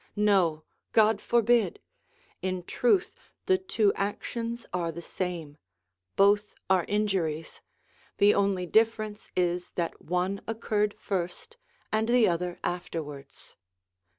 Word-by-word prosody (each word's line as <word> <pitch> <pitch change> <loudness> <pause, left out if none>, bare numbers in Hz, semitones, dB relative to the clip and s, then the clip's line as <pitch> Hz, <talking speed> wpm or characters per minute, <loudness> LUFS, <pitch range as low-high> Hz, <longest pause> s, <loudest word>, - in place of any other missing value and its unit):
No, 190 -7 +3 0.3
God 215 -1 +4
forbid! 235 - +2 0.6
In 185 -1 -2
truth 245 - +1 0.3
the 375 -1 +3
two 225 - +2
actions 230 +3 -3
are 170 -2 -1
the 165 - -8
same; 170 -4 -5 0.6
both 205 +1 +3 0.2
are 185 -3 +4
injuries; 190 -7 -1 0.6
the 205 +1 +6
only 195 -2 +1
difference 215 +1 +1
is 180 0 0
that 170 -2 -3
one 180 +3 -1
occurred 215 -2 0
first, 185 - -4 0.4
and 220 +1 +1
the 240 -2 +5
other 175 0 -1
afterwards. 150 -5 -6
200 Hz, 110 wpm, -28 LUFS, 175-220 Hz, 0.6 s, the